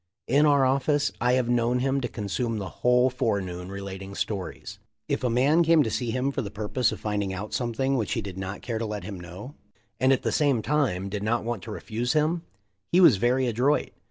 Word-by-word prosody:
In 145 Hz, +4 st, +4 dB
our 140 Hz, -2 st, +4 dB
office 145 Hz, +2 st, +1 dB
I 125 Hz, +1 st, +3 dB
have 125 Hz, -2 st, +2 dB
known 120 Hz, 0 st, +2 dB
him 135 Hz, +2 st, 0 dB
to 120 Hz, -, -1 dB
consume 115 Hz, +2 st, -3 dB
the 95 Hz, -3 st, -4 dB
whole 125 Hz, +1 st, +4 dB
fore 120 Hz, -5 st, 0 dB
noon 90 Hz, -1 st, -6 dB
relating 100 Hz, 0 st, -7 dB
stories. 100 Hz, -3 st, -4 dB, 0.3 s
If -, -, -1 dB
a 125 Hz, -, +2 dB
man 135 Hz, +8 st, +3 dB
came 165 Hz, -2 st, +5 dB
to 110 Hz, -, -2 dB
see 120 Hz, +1 st, -2 dB
him 130 Hz, +4 st, 0 dB
for 135 Hz, -, -2 dB
the 105 Hz, -, -5 dB
purpose 110 Hz, +3 st, -1 dB
of 110 Hz, -, -6 dB
finding 100 Hz, -2 st, -2 dB
out 105 Hz, +3 st, -6 dB
something 130 Hz, +3 st, 0 dB
which 110 Hz, -6 st, -1 dB
he 115 Hz, -, -1 dB
did 95 Hz, -2 st, -7 dB
not 95 Hz, +1 st, -6 dB
care 115 Hz, -2 st, -3 dB
to 115 Hz, -, -2 dB
let 105 Hz, -1 st, -5 dB
him 100 Hz, -3 st, -7 dB
know 90 Hz, -, -9 dB, 0.5 s
and 130 Hz, +2 st, +4 dB
at 135 Hz, -, +2 dB
the -, -, 0 dB
same 140 Hz, -7 st, +2 dB
time 130 Hz, -11 st, 0 dB
did 100 Hz, +1 st, -4 dB
not 115 Hz, +3 st, 0 dB
want 115 Hz, -3 st, -3 dB
to -, -, -7 dB
refuse 120 Hz, +2 st, -2 dB
him, 155 Hz, +2 st, +1 dB, 0.5 s
he 180 Hz, -, +5 dB
was 160 Hz, -, +7 dB
very 125 Hz, +5 st, +2 dB
adroit. 125 Hz, +5 st, +1 dB
120 Hz, 225 wpm, -26 LUFS, 105-135 Hz, 0.5 s, was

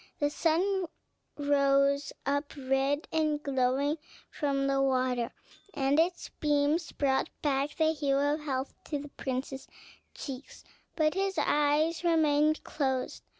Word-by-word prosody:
The 290 Hz, -1 st, +1 dB
sun 360 Hz, +4 st, +1 dB, 0.5 s
rose 280 Hz, -1 st, +2 dB
up 285 Hz, +2 st, -1 dB
red 270 Hz, +2 st, 0 dB
and 305 Hz, -2 st, 0 dB
glowing 275 Hz, +3 st, +1 dB, 0.3 s
from 275 Hz, -2 st, 0 dB
the 275 Hz, 0 st, +2 dB
water, 255 Hz, -3 st, +1 dB, 0.4 s
and 275 Hz, +1 st, +2 dB
its 350 Hz, +2 st, 0 dB
beams 295 Hz, +2 st, +1 dB
brought 270 Hz, -2 st, +1 dB
back 285 Hz, 0 st, 0 dB
the 315 Hz, 0 st, +3 dB
hue 285 Hz, -3 st, +1 dB
of 290 Hz, +2 st, +1 dB
health 270 Hz, -3 st, -3 dB
to 295 Hz, -, -2 dB
the 290 Hz, +1 st, -8 dB
prince's 265 Hz, 0 st, -4 dB, 0.5 s
cheeks; 270 Hz, -1 st, -8 dB, 0.3 s
but 310 Hz, -1 st, +2 dB
his 385 Hz, 0 st, -1 dB
eyes 300 Hz, +3 st, +2 dB
remained 310 Hz, -2 st, +3 dB
closed. 265 Hz, -3 st, -2 dB
285 Hz, 125 wpm, -30 LUFS, 275-310 Hz, 0.5 s, the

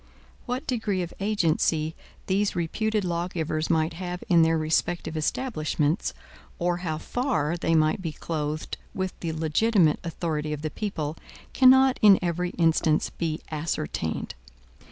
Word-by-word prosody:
What 250 Hz, +4 st, -2 dB
degree 215 Hz, -, -1 dB
of 175 Hz, -, -7 dB
agency 165 Hz, -6 st, +1 dB, 0.3 s
these 200 Hz, +1 st, +1 dB
reputed 210 Hz, +5 st, -1 dB
lawgivers 170 Hz, -2 st, -2 dB
might 160 Hz, 0 st, +2 dB
have 180 Hz, +1 st, -5 dB
in 170 Hz, -2 st, +6 dB
their 165 Hz, 0 st, +4 dB
respective 160 Hz, +1 st, 0 dB
establishments, 155 Hz, -, -1 dB, 0.4 s
or 175 Hz, 0 st, 0 dB
how 165 Hz, -3 st, -3 dB
far 195 Hz, -, -1 dB
they 165 Hz, -1 st, +1 dB
might 155 Hz, +3 st, +2 dB
be 165 Hz, -3 st, -3 dB
clothed 155 Hz, -1 st, -4 dB, 0.2 s
with 190 Hz, -1 st, -2 dB
the 165 Hz, -, -3 dB
legitimate 160 Hz, +2 st, +2 dB
authority 155 Hz, -3 st, -2 dB
of 150 Hz, 0 st, -6 dB
the 155 Hz, -, -2 dB
people, 160 Hz, -7 st, -3 dB, 0.4 s
cannot 265 Hz, 0 st, +6 dB
in 205 Hz, -3 st, +8 dB
every 175 Hz, +1 st, -1 dB
instance 160 Hz, -2 st, +2 dB
be 160 Hz, -2 st, -3 dB
ascertained. 150 Hz, -, -3 dB
170 Hz, 135 wpm, -26 LUFS, 155-190 Hz, 0.4 s, in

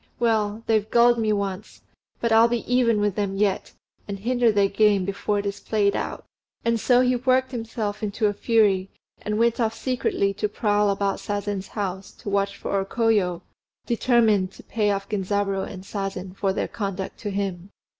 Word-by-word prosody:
Well, 220 Hz, -2 st, +1 dB
they've 220 Hz, -1 st, +1 dB
gulled 240 Hz, 0 st, +5 dB
me 220 Hz, -1 st, +1 dB
once; 200 Hz, -1 st, -3 dB, 0.4 s
but 235 Hz, -, 0 dB
I'll 225 Hz, +1 st, +6 dB
be 235 Hz, -1 st, -1 dB
even 240 Hz, -3 st, +2 dB
with 205 Hz, -1 st, +1 dB
them 200 Hz, -1 st, -2 dB
yet, 200 Hz, -1 st, 0 dB, 0.3 s
and 200 Hz, -1 st, -4 dB
hinder 240 Hz, +2 st, +2 dB
their 200 Hz, -1 st, +3 dB
game 200 Hz, -1 st, +3 dB
before 200 Hz, +1 st, -1 dB
it 200 Hz, -, -2 dB
is 200 Hz, 0 st, -3 dB
played 205 Hz, -1 st, +1 dB
out!" -, -, -4 dB, 0.4 s
And 230 Hz, 0 st, +2 dB
so 245 Hz, +2 st, +4 dB
he 250 Hz, 0 st, +3 dB
worked 260 Hz, +1 st, +2 dB
himself 225 Hz, -3 st, -3 dB
up -, -, -12 dB
into 210 Hz, +2 st, -1 dB
a 205 Hz, -, +2 dB
fury, 200 Hz, -4 st, +2 dB, 0.3 s
and 210 Hz, 0 st, -2 dB
went 235 Hz, +1 st, +2 dB
off 225 Hz, -1 st, 0 dB
secretly 240 Hz, -6 st, 0 dB
to 210 Hz, +1 st, -2 dB
prowl 205 Hz, -1 st, +1 dB
about 200 Hz, 0 st, 0 dB
Sazen's 205 Hz, -1 st, -3 dB
house 195 Hz, -2 st, -4 dB
to 200 Hz, -, -7 dB
watch 200 Hz, 0 st, 0 dB
for -, -, -3 dB
O -, -, 0 dB
Koyo, 195 Hz, -5 st, +1 dB, 0.4 s
determined 225 Hz, -5 st, +2 dB
to -, -, -14 dB
pay 215 Hz, -2 st, 0 dB
off 200 Hz, 0 st, -1 dB
Genzaburô 195 Hz, -1 st, -1 dB
and 185 Hz, -, -9 dB
Sazen 195 Hz, -2 st, -5 dB
for 195 Hz, -1 st, 0 dB
their -, -, -2 dB
conduct 195 Hz, -2 st, -5 dB
to 210 Hz, -, -4 dB
him. 195 Hz, -2 st, -3 dB
205 Hz, 185 wpm, -24 LUFS, 195-225 Hz, 0.4 s, I'll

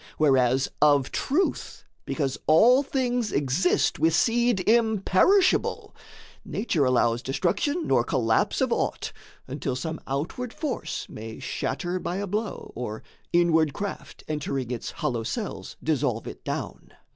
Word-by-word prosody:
Whereas, 135 Hz, -3 st, +3 dB
of 145 Hz, -3 st, +4 dB
truth, 330 Hz, +8 st, -1 dB, 0.2 s
because 140 Hz, -4 st, -1 dB
all 235 Hz, -, +6 dB
things 250 Hz, -5 st, -1 dB
exist, 145 Hz, +6 st, +1 dB
With 160 Hz, 0 st, +3 dB
seed 235 Hz, -3 st, +2 dB
imperishable, 225 Hz, -, +3 dB, 0.5 s
Nature 180 Hz, -, 0 dB
allows 120 Hz, -2 st, +2 dB
Destruction 200 Hz, -, -1 dB
nor 125 Hz, -3 st, +3 dB
collapse 115 Hz, -3 st, +1 dB
of -, -, +2 dB
aught, -, -, -2 dB, 0.3 s
until 135 Hz, -1 st, -3 dB
Some 160 Hz, +5 st, -4 dB
outward 165 Hz, -, -3 dB
force 295 Hz, -6 st, -4 dB
may 110 Hz, +1 st, -8 dB
shatter 175 Hz, +7 st, -3 dB
by 175 Hz, -, -3 dB
a 200 Hz, +2 st, -2 dB
blow, 210 Hz, +3 st, -4 dB
Or 110 Hz, -3 st, -5 dB, 0.3 s
inward 160 Hz, -4 st, +3 dB
craft, 200 Hz, +4 st, -6 dB
entering 140 Hz, -5 st, -3 dB
its 120 Hz, -, -4 dB
hollow 120 Hz, -3 st, -2 dB
cells, 110 Hz, -, -5 dB
Dissolve -, -, 0 dB
it -, -, -9 dB
down. -, -, -5 dB
160 Hz, 125 wpm, -26 LUFS, 130-220 Hz, 0.5 s, all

